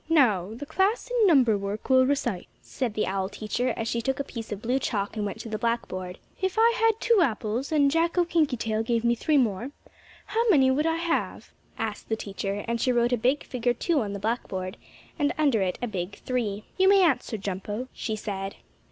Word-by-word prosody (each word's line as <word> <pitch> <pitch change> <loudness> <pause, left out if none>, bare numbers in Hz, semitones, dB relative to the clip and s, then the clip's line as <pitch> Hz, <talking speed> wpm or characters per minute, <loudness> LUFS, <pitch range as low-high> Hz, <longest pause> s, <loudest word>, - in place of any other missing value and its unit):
"Now 220 - +3
the 290 - -7
class 390 +10 0
in 470 -4 +4
number 260 - +5
work 200 +2 -5
will 260 -1 +5
recite," 240 -9 -1
said 240 -5 -4
the 215 - +1
owl 190 0 -2
teacher, 220 +4 -2
as 225 - -2
she 235 - -1
took 265 +3 -1
a - - 0
piece 230 -4 -8
of 205 - -3
blue 250 +3 +1
chalk 205 -5 -2
and 210 -1 -1
went 200 - -6
to - - -8
the 215 -1 -3
blackboard. 185 -6 -2 0.2
"If 380 +2 -1
I 460 +1 +5
had 450 -1 +4
two 465 -3 +3
apples, 235 -1 -1
and 285 -3 +4
Jacko 335 +2 +2
Kinkytail 250 -10 0
gave 230 0 0
me 235 0 +3
three 295 +5 +1
more, 235 -1 +1 0.6
how 450 +3 0
many 270 -8 +5
would 300 +4 +1
I 325 - +1
have?" 335 0 -2 0.3
asked 220 -2 -4
the 220 - +1
teacher, 200 -1 -4
and 235 0 -1
she 255 - +2
wrote 240 0 +2
a - - +5
big 255 +5 +1
figure 245 -1 -1
2 310 +3 +1
on 205 -2 -3
the 200 - -4
blackboard, 190 -4 -3 0.4
and 290 +2 +2
under 280 -9 +3
it 185 -1 -1
a - - 0
big 190 -3 -4
3. 215 -5 -2 0.2
"You 380 0 +6
may 395 -1 +6
answer, 255 -8 +1
Jumpo," 205 +5 -4
she 220 - -3
said. 195 -2 -5
240 Hz, 215 wpm, -26 LUFS, 210-290 Hz, 0.6 s, You